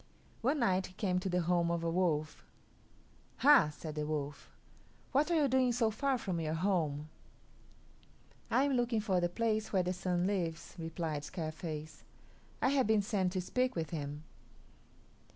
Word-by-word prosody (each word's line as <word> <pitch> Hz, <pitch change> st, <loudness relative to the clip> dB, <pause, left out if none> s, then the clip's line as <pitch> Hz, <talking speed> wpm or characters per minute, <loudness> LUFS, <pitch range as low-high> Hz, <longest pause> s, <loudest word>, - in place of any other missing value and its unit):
One 270 Hz, +6 st, +2 dB
night 190 Hz, -5 st, +2 dB
he 180 Hz, -, -16 dB
came 185 Hz, -2 st, 0 dB
to 190 Hz, -, -3 dB
the 180 Hz, 0 st, +1 dB
home 170 Hz, 0 st, +2 dB
of 170 Hz, -1 st, -1 dB
a 165 Hz, -, 0 dB
wolf. 160 Hz, -4 st, 0 dB, 0.9 s
"Hah!" 280 Hz, -, +6 dB
said 155 Hz, +1 st, -7 dB
the 150 Hz, 0 st, -3 dB
wolf; 145 Hz, -2 st, -4 dB, 0.6 s
"what 290 Hz, +5 st, +2 dB
are 340 Hz, -, +2 dB
you 300 Hz, -3 st, +4 dB
doing 260 Hz, -1 st, +3 dB
so 230 Hz, -2 st, +2 dB
far 270 Hz, +4 st, 0 dB
from 185 Hz, -7 st, -3 dB
your 155 Hz, -1 st, -1 dB
home?" 160 Hz, -5 st, 0 dB, 1.4 s
"I 260 Hz, -, +3 dB
am 285 Hz, -1 st, +1 dB
looking 240 Hz, -2 st, +1 dB
for 195 Hz, -4 st, +1 dB
the 175 Hz, -, +1 dB
place 220 Hz, +2 st, -1 dB
where 190 Hz, -3 st, +2 dB
the 180 Hz, +1 st, -1 dB
Sun 180 Hz, -1 st, -1 dB
lives," 170 Hz, -4 st, -2 dB
replied 165 Hz, -2 st, -3 dB
Scarface. 155 Hz, -1 st, -6 dB, 0.6 s
"I -, -, +4 dB
have 270 Hz, -4 st, +2 dB
been 215 Hz, -2 st, +3 dB
sent 195 Hz, -4 st, 0 dB
to 185 Hz, -, 0 dB
speak 250 Hz, +7 st, 0 dB
with 160 Hz, -3 st, -3 dB
him." 150 Hz, -2 st, -4 dB
180 Hz, 170 wpm, -33 LUFS, 160-225 Hz, 1.4 s, Hah